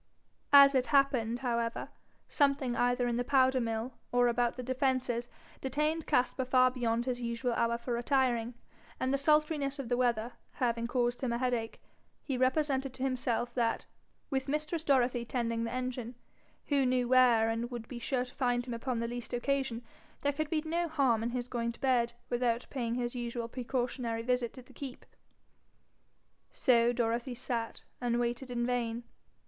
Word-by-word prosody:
As 280 0 +9
it 255 -2 +2
happened, 245 -3 +2
however, 235 -2 -1 0.4
something 275 -4 +1
either 245 0 +2
in 240 -1 0
the 245 - +1
powder 260 0 +3
mill 230 +2 -2 0.2
or 245 0 +4
about 240 0 +1
the 250 - -4
defences 255 -2 0 0.3
detained 300 +4 -1
Caspar 250 +1 +1
far 255 0 +4
beyond 240 -2 -1
his 250 -1 -2
usual 235 +1 -1
hour 235 0 +1
for 235 +1 -4
retiring, 240 -1 +1 0.4
and 260 +1 0
the - - +3
sultriness 300 -1 +2
of 270 -4 -5
the 245 - +1
weather 240 -1 +1 0.2
having 235 -3 0
caused 245 -1 0
him 255 -3 -1
a 235 - 0
headache, 240 -3 -1 0.4
he 270 - -2
represented 265 0 +1
to 260 - -5
himself 245 -2 -1
that, 235 -2 0 0.5
with 265 0 -1
mistress 305 +3 -2
Dorothy 250 -4 +2
tending 230 -1 -1
the 230 - -4
engine, 250 -1 -4 0.5
who 280 -2 +2
knew 250 -1 +1
where 245 -3 +5
and 230 +1 -1
would 240 -2 -6
be 245 - -7
sure 250 +1 -1
to 250 - -13
find 245 -2 0
him 245 - -5
upon 235 0 -2
the 230 - -1
least 240 0 -6
occasion, 260 -1 -1 0.4
there 285 0 +1
could 310 +1 -2
be 310 -1 0
no 340 +2 0
harm 270 -8 +2
in 230 - -1
his 245 0 -3
going 235 -2 -2
to - - -17
bed 240 -3 +2
without 240 -1 0
paying 235 -4 -2
his 240 -1 -2
usual 240 -1 -3
precautionary 240 -1 -2
visit 250 -1 0
to 255 - -11
the 260 +1 -19
keep. 265 -2 -8 1.5
So 240 -1 +3
Dorothy 240 +1 -1
sat, 230 -2 -4 0.2
and 240 -1 +1
waited 240 +2 -2
in 240 -1 -1
vain. 240 -1 -1
245 Hz, 175 wpm, -31 LUFS, 235-265 Hz, 1.5 s, As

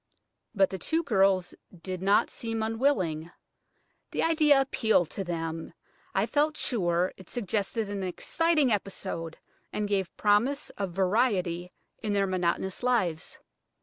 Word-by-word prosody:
But 195 -2 +3
the 190 - -4
two 325 - 0
girls 195 - +2 0.3
did 185 -1 -4
not 200 +2 +3
seem 225 -1 -3
unwilling. 220 - 0 0.8
The - - -1
idea 305 -4 +5
appealed 220 - +2
to 195 - -3
them, 165 -2 -4 0.4
I - - +3
felt 300 +1 +1
sure; 180 -6 0
it 190 - -14
suggested 215 0 -2
an 200 -1 -4
exciting 300 - +1
episode, 190 -5 -3 0.3
and 210 0 -2
gave 195 -3 -1
promise 230 +8 +2
of 195 -2 -4
variety 185 -3 +1 0.3
in 215 -2 -1
their 200 -1 +2
monotonous 185 0 -1
lives. 215 -11 0
200 Hz, 130 wpm, -28 LUFS, 180-235 Hz, 0.8 s, idea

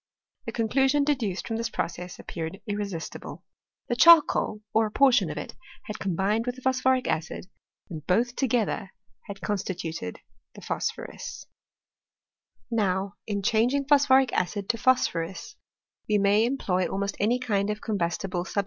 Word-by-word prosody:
The - - -2
conclusion 270 +5 +2
de^* 295 0 +3
duced 205 -7 -3
ffQii^ 225 - -3
this 230 0 -2
piocess 180 -3 -4
appeared 165 +3 -6
irresistible; 205 -6 -5 0.4
the 240 - 0
charcoal, 305 -8 +6
or 220 0 +3
a - - -9
portion 265 +1 +4
of - - -5
it, - - -6 0.3
had 210 - -7
combined 195 +5 0
with 245 - -1
the 255 - -12
phQ^phoric 260 0 +2
acid, 160 +3 -2 0.4
and 160 -4 -7
both 235 +6 +2
together 225 -6 0 0.4
h^d 200 -1 -7
constituted 175 - -4 0.4
phosphonm. - - -5 1.3
Now, 195 -3 0
in 200 -2 -2
changing 235 +6 +2
phosphoric 270 -3 +4
acid 190 +3 -1
into 230 +4 -1
phosphorus, 175 -8 0 0.5
we 210 - +4
may 205 +2 +4
employ 185 -9 0
almost 200 +1 -2
any 225 +5 +2
kind 210 -5 0
of 210 0 -2
combustible 180 -3 -2
sub? 200 - -2
210 Hz, 140 wpm, -26 LUFS, 190-245 Hz, 1.3 s, charcoal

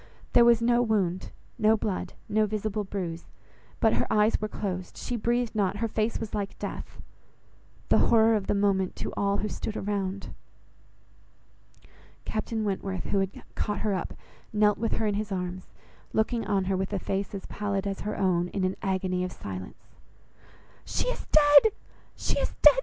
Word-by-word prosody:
There 240 - +7
was 235 -1 +5
no 240 +1 +4
wound, 195 -6 0 0.3
no 220 +1 +5
blood, 205 -3 -3
no 215 0 +2
visible 215 0 -2
bruise; 180 -4 -5 0.5
but 220 - +4
her - - +1
eyes 210 +1 +3
were 215 - 0
closed, 185 -4 -4
she 245 - -3
breathed 240 +1 0
not, 205 -2 0
her 230 +2 0
face 220 +1 0
was 225 - -5
like 200 -1 -3
death. - - -6 0.9
The - - +5
horror 225 -1 +6
of 205 -3 -2
the - - +2
moment 195 -2 +1
to - - -4
all 200 0 +1
who 210 - -1
stood 215 +1 -4
around! 195 -1 -3 1.9
Captain 220 +1 -2
Wentworth, 195 -2 -2
who 200 - 0
had 195 0 -3
caught 210 -2 -2
her 210 -2 +1
up, 185 - -3 0.4
knelt 210 -1 +3
with 230 0 0
her 225 - 0
in 210 - +1
his 210 0 -3
arms, 180 0 -4 0.4
looking 225 +1 0
on 195 -3 +1
her 190 +1 +1
with 190 +1 -2
a - - +1
face 195 +2 -2
as 195 - -6
pallid 200 -1 -2
as 195 -1 -2
her 210 +1 -3
own, 180 -3 +2
in 190 +2 -3
an 185 +1 0
agony 185 -1 0
of 180 - -3
silence. 95 -2 -8 1.0
"She - - -1
is - - -5
dead! 295 +7 +7 0.4
she - - -1
is - - -2
dead!" - - +11
205 Hz, 175 wpm, -28 LUFS, 190-220 Hz, 1.9 s, dead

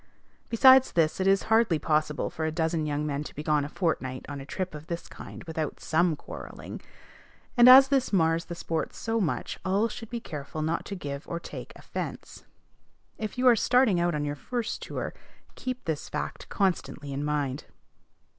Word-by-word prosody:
Besides 260 +3 +7
this, 160 0 +2
it 190 - +1
is 195 0 +4
hardly 220 -6 +3
possible 150 0 0
for 160 - -4
a 160 - 0
dozen 160 -1 0
young 150 0 -1
men 145 -1 -2
to - - -10
be 150 - -5
gone 150 -1 +2
a 145 - -5
fortnight 130 -7 -2
on 145 -1 -6
a 135 - -10
trip 185 +2 -3
of 150 +1 -9
this 170 0 -5
kind - - -10
without 160 -2 -4
some 165 0 +2
quarrelling; - - -9 0.7
and, 240 0 +8
as 265 +1 +10
this 270 -2 +2
mars 165 -3 +2
the 175 - -6
sport 165 -1 -3
so 225 0 -1
much, 170 - -2
all 200 +4 +1
should 225 0 -8
be 240 - -3
careful 155 -5 -6
not 160 +2 -1
to 200 - -5
give 140 -5 -6
or 170 - -3
take - - -8
offence. - - -7 0.7
If 215 +3 -4
you 255 - 0
are 245 - +8
starting 230 -4 +3
out 175 -1 +1
on 145 0 -1
your 145 - -2
first 235 - -4
tour, - - -4 0.4
keep 255 0 -5
this 160 -3 -3
fact - - -5
constantly 160 -7 -1
in 140 +2 -3
mind. 145 -2 -1
165 Hz, 190 wpm, -28 LUFS, 150-215 Hz, 0.7 s, as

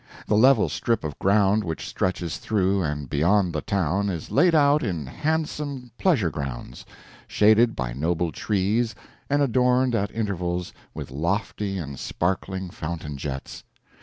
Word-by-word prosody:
The 105 - +1
level 125 +1 +5
strip 115 -1 -1
of 75 -2 -5
ground 100 +1 +3
which 80 -4 -4
stretches 90 -3 -2
through 100 -2 +1
and 75 -3 -3
beyond 85 +6 +2
the 75 - -2
town 100 +1 0
is 85 -5 -5
laid 175 -2 +4
out 145 0 +4
in 85 - -2
handsome 145 - -3
pleasure 130 - +2
grounds, 65 -3 -6 0.4
shaded 110 +2 +4
by 65 -2 -3
noble 80 +4 -1
trees 110 +5 0 0.3
and 145 +1 +3
adorned 125 0 +2
at 100 -3 0
intervals 90 -5 -3 0.2
with - - -7
lofty 95 +6 -2
and 70 -7 -6
sparkling 95 +1 -2
fountain 75 -2 -5
jets. 70 -1 -6
95 Hz, 140 wpm, -24 LUFS, 80-115 Hz, 0.4 s, level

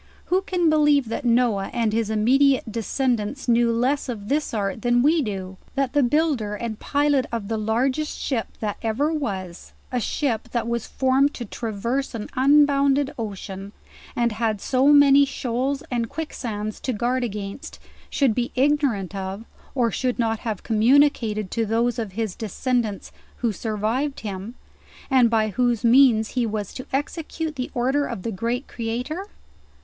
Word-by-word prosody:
Who 375 - +4
can 360 -3 0
believe 295 -5 +3
that 230 - -4
Noah 230 -5 +2
and 230 -3 0
his 225 -1 0
immediate 250 +3 +3
descendants 235 +2 -1
knew 235 0 +4
less 255 +4 0
of 210 -4 -5
this 295 +1 0
art 200 -1 -2
than 240 +1 +3
we 315 +3 +4
do] 190 -5 -5 0.2
that 275 -2 0
the 290 - +4
builder 255 -6 +1
and 220 0 -5
pilot 285 -2 +1
of 225 -4 -4
the 225 - -1
largest 255 +8 0
ship 240 -5 -2
that 210 -2 -2
ever 255 +8 0
was, 190 - -5 0.2
a 250 - 0
ship 235 -1 -1
that 235 -2 -1
was 235 -1 -2
formed 265 +2 +2
to 240 - -5
tra 225 +2 -5
verse 235 +6 -2
an 215 -2 -5
unbounded 280 0 +4
ocean, 200 -2 -6 0.4
and 235 -1 +1
had 220 -1 -1
so 260 +5 +2
many 285 -1 +7
shoals 270 +1 -2
and 235 -2 -1
quick 320 -1 -5
sands 215 -3 -4
to 255 - -2
guard 245 +4 0
against, 205 0 -6 0.3
should 270 -6 +2
be 240 +1 -2
ignorant 260 - +1
of, 195 +2 -5 0.3
or 240 -3 +2
should 250 +2 -1
not 225 -2 0
have 220 -5 -4
communicated 225 -3 +3
to 230 - 0
those 230 +2 0
of 215 -5 -4
his 220 -2 -2
descendants 225 0 -2 0.3
who 235 -2 0
survived 220 +7 -2
him, 205 +2 -6 0.6
and 255 -3 +5
by 220 -1 +2
whose 240 +1 0
means 235 -3 +5
he 245 -2 0
was 210 -2 -4
to 255 - -8
execute 310 +2 -3
the 255 -2 -3
order 265 +4 +1
of 185 - -6
the 230 - -2
Great 235 +6 -2
Creator? 250 - -4
240 Hz, 165 wpm, -23 LUFS, 215-275 Hz, 0.6 s, many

